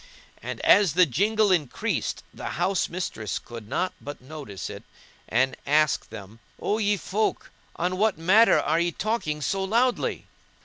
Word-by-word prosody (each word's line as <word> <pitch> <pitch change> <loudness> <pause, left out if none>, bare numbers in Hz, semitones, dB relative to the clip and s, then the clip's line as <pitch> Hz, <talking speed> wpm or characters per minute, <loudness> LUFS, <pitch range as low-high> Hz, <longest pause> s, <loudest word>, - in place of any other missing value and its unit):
And - - -5
as 200 -7 +5
the 180 +2 +6
jingle 205 - +2
increased 155 -8 -1
the - - -7
house 195 -1 +1
mistress 110 - -4
could 115 -3 -9
not 185 - -1
but 145 +1 -7
notice 130 -7 -8
it - - -8 0.5
and 130 +3 +2
asked 150 -1 +2
them, 100 +3 -10 0.2
"O 215 - 0
ye 205 -1 +2
folk! 210 +4 -2 0.2
on 180 +2 -1
what 215 +1 +2
matter 195 +8 +5
are 160 +2 +1
ye 170 0 +1
talking 165 -8 -2
so 195 +5 -1
loudly?" 235 +6 0
175 Hz, 150 wpm, -25 LUFS, 145-205 Hz, 0.5 s, the